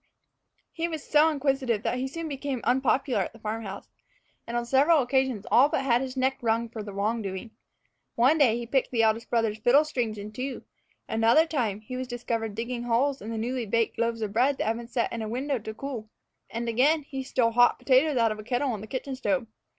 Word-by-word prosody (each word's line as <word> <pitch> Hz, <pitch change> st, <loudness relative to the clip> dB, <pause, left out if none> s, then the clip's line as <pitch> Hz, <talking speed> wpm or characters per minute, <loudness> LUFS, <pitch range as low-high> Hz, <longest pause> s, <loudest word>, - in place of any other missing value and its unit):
He 330 Hz, 0 st, -2 dB
was 315 Hz, -3 st, -5 dB
so 305 Hz, +1 st, +4 dB
inquisitive 270 Hz, -7 st, 0 dB
that 250 Hz, -, -1 dB
he 260 Hz, -, -1 dB
soon 330 Hz, +4 st, -5 dB
became 275 Hz, -3 st, -4 dB
unpopular 265 Hz, +1 st, +2 dB
at -, -, -4 dB
the 225 Hz, -, -15 dB
farm 220 Hz, +1 st, -3 dB
house, 200 Hz, -2 st, -7 dB, 0.6 s
and 235 Hz, +1 st, -2 dB
on 240 Hz, -, -1 dB
several 275 Hz, +4 st, +4 dB
occasions 260 Hz, -4 st, 0 dB
all 270 Hz, +4 st, +6 dB
but 300 Hz, -4 st, 0 dB
had 245 Hz, -2 st, +3 dB
his 265 Hz, 0 st, -5 dB
neck 260 Hz, +1 st, +1 dB
wrung 230 Hz, 0 st, 0 dB
for 225 Hz, -1 st, -6 dB
wrongdoing. 205 Hz, +1 st, -3 dB, 0.6 s
One 265 Hz, +7 st, +4 dB
day 240 Hz, -6 st, +4 dB
he 240 Hz, -, -5 dB
picked 260 Hz, +2 st, 0 dB
the 230 Hz, -2 st, +1 dB
eldest 225 Hz, +1 st, +1 dB
brother's 225 Hz, -2 st, 0 dB
fiddle 270 Hz, +7 st, +5 dB
strings 240 Hz, -8 st, -2 dB
in 205 Hz, +1 st, -7 dB
two; 255 Hz, +5 st, -5 dB, 0.4 s
another 225 Hz, +8 st, +4 dB
time 230 Hz, -10 st, -2 dB
he 255 Hz, +3 st, -7 dB
was 255 Hz, 0 st, -4 dB
discovered 230 Hz, -3 st, -3 dB
digging 235 Hz, +2 st, -3 dB
holes 260 Hz, +4 st, +1 dB
in 215 Hz, -, -7 dB
the 225 Hz, -, -3 dB
newly 240 Hz, +1 st, -2 dB
baked 230 Hz, +2 st, 0 dB
loaves 230 Hz, -1 st, 0 dB
of 205 Hz, -2 st, -4 dB
bread 260 Hz, +5 st, +2 dB
that -, -, -1 dB
had 225 Hz, +1 st, 0 dB
been 235 Hz, 0 st, -8 dB
set 240 Hz, -1 st, -1 dB
in 230 Hz, -, -3 dB
a 215 Hz, -, -4 dB
window 265 Hz, +3 st, -1 dB
to 220 Hz, 0 st, -6 dB
cool; 225 Hz, -2 st, -6 dB, 0.4 s
and, 235 Hz, +1 st, -4 dB
again, 280 Hz, +7 st, +3 dB
he 270 Hz, -1 st, -6 dB
stole 250 Hz, -3 st, +1 dB
hot 245 Hz, +1 st, +4 dB
potatoes 270 Hz, +2 st, +3 dB
out 230 Hz, -2 st, +3 dB
of 215 Hz, -, -5 dB
a -, -, -7 dB
kettle 250 Hz, +4 st, 0 dB
on 215 Hz, -4 st, -4 dB
the 215 Hz, -, -8 dB
kitchen 265 Hz, +3 st, -4 dB
stove. 265 Hz, -1 st, 0 dB
245 Hz, 220 wpm, -27 LUFS, 225-270 Hz, 0.6 s, all